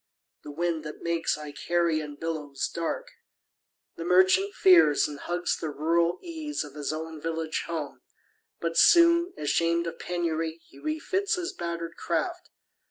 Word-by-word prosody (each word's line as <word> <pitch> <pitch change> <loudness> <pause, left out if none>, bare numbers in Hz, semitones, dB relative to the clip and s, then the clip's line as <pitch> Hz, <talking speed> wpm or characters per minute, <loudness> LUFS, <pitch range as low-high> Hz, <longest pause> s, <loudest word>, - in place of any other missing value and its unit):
The - - -10
winds 165 +1 -2
that 150 - -8
make 170 -1 -1
Icarian 150 +1 -1
billows 150 -3 -3
dark - - -3 0.9
The 165 - -4
merchant 185 - +4
fears, 165 -6 +6
and 145 -1 -8
hugs 175 0 -1
the 160 - -4
rural 170 +4 +1
ease 315 - -4
Of 145 -2 -11
his 145 -1 -3
own 160 0 -6
village 160 0 -2
home; 160 -4 -5 0.6
but 165 0 0
soon, 340 +1 +6
ashamed 170 +3 +1
Of 165 -1 -6
penury, 165 -2 -2
he - - -17
refits 370 +6 -1
his 360 +1 -4
batter'd 170 - -5
craft. - - -2
165 Hz, 140 wpm, -27 LUFS, 155-180 Hz, 0.9 s, fears